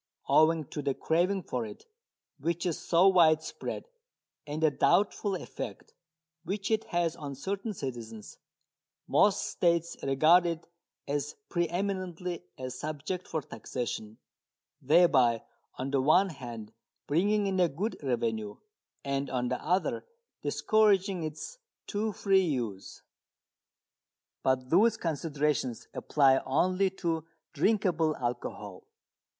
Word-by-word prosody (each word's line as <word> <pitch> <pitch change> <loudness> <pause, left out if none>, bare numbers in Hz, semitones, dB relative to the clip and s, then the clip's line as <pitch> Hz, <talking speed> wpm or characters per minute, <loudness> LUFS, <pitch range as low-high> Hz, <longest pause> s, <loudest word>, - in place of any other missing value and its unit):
Owing 160 0 +4
to 150 - -4
the 140 -2 -1
craving 180 +4 +1
for 125 -5 -3
it, 105 -2 -9 0.5
which 170 +5 -1
is 175 -3 -1
so 175 +3 +4
widespread, 160 -4 +2 0.6
and 150 +2 -3
the 155 - +5
doubtful 195 +7 +2
effect - - -7 0.5
which 195 +5 -3
it 220 0 +1
has 170 -2 0
on 140 -2 -6
certain 195 - -3
citizens, 115 -7 -7 0.7
most 205 -1 +3
states 170 -1 +1
regard 155 +6 +5
it 165 -1 -4 0.4
as 145 0 -2
pre 175 -2 +1
eminently 180 -1 -3
a 130 -1 -5
subject 155 +7 -5
for 160 -3 -3
taxation, 110 -3 -5 0.6
thereby 135 -6 +4 0.3
on 135 +1 -3
the 140 -2 +2
one 180 +8 +4
hand 120 -7 -8 0.3
bringing 200 +7 +2
in 190 -1 0
a 175 -2 +4
good 200 +11 -3
revenue, 115 -6 -1 0.5
and 140 0 -2
on 125 -1 -1
the 125 - -3
other 180 +5 0 0.4
discouraging 200 -4 +2
its 160 - -6 0.3
too 215 +1 -1
free 195 -1 +3
use. 120 - -3 1.4
But 130 -1 0
those 220 +6 +5
considerations 150 - -1
apply 135 -3 +3
only 185 +8 +2 0.2
to 165 -1 0 0.3
drinkable 180 -7 +2
alcohol. 120 -5 -5
160 Hz, 120 wpm, -30 LUFS, 135-185 Hz, 1.4 s, the